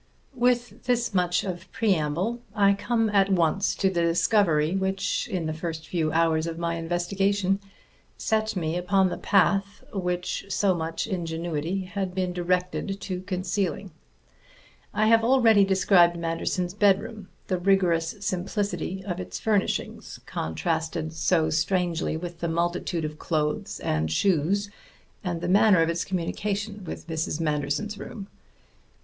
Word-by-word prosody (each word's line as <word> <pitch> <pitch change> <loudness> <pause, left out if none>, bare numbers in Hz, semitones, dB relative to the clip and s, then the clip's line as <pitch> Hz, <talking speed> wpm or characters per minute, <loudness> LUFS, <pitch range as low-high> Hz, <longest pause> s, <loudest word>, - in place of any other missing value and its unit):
With 245 -1 0
this 240 -3 +1
much 180 -1 +2
of 180 -1 -6
preamble 190 +3 0
I 200 -2 +5
come 225 +2 0
at 195 -1 +3
once 180 +2 +2
to 195 - +1
the 180 -3 +1
discovery 170 -1 +2
which, 195 +1 -1
in 180 -4 -2
the 155 - -2
first 160 0 -5
few 160 -2 0
hours 160 0 +2
of 165 -1 -4
my 170 0 -1
investigation, 190 +4 0 0.6
set 220 -1 0
me 165 -2 -1
upon 190 +1 +2
the - - -5
path 200 0 +2
which 180 -2 -2
so 200 -1 +2
much 165 -1 -3
ingenuity 170 -2 -2
had 185 -1 -4
been 185 -1 -1
directed 180 +2 -1
to 185 -2 -4
concealing. 185 +1 -2 1.0
I 215 - +1
have 225 +1 +5
already 230 -4 +5
described 190 -3 +4
Manderson's 170 +2 -2
bedroom, 205 +1 +1 0.2
the 185 -2 -1
rigorous 175 -3 +2
simplicity 190 -1 -2
of 180 -2 -3
its 185 - -5
furnishings, 210 -3 -1
contrasted 160 - -2
so 160 0 +1
strangely 165 0 0
with 175 0 -7
the 170 - -2
multitude 170 0 -1
of 150 0 -6
clothes 150 -2 -1
and 80 0 0
shoes, 195 - +1 0.5
and 175 -3 -3
the - - -2
manner 195 -2 +5
of 165 - 0
its 170 +1 -1
communication 200 +3 -3
with - - -7
Mrs. 160 -1 -2
Manderson's 155 +7 -1
room. 200 -3 -8
180 Hz, 140 wpm, -26 LUFS, 165-200 Hz, 1.0 s, I